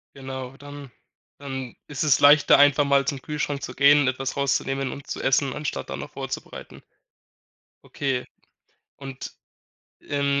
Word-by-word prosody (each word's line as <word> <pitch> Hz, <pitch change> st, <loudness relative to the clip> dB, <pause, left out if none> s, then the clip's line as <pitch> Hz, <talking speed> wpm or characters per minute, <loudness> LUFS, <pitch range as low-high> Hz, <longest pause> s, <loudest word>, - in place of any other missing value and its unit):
Genau, 130 Hz, -1 st, -7 dB
dann 145 Hz, 0 st, -10 dB, 0.5 s
dann 130 Hz, -3 st, -6 dB
ist 145 Hz, 0 st, -3 dB
es 150 Hz, -4 st, +3 dB
leichter, 145 Hz, +1 st, +7 dB
einfach 145 Hz, 0 st, +5 dB
mal 140 Hz, 0 st, +3 dB
zum 140 Hz, -1 st, -3 dB
Kühlschrank 145 Hz, -1 st, -3 dB
zu -, -, -6 dB
gehen, 140 Hz, 0 st, +5 dB
etwas 130 Hz, +2 st, -2 dB
rauszunehmen 135 Hz, -1 st, -1 dB
und 140 Hz, -, -10 dB
zu -, -, -5 dB
essen, 135 Hz, 0 st, +2 dB
anstatt 150 Hz, +2 st, -4 dB
dann -, -, -5 dB
noch -, -, -8 dB
vorzubereiten. -, -, -7 dB, 1.0 s
Okay. 135 Hz, -3 st, -3 dB, 0.7 s
Und, 135 Hz, -1 st, -8 dB, 0.7 s
ähm, 140 Hz, -1 st, 0 dB
140 Hz, 140 wpm, -24 LUFS, 135-145 Hz, 1.0 s, leichter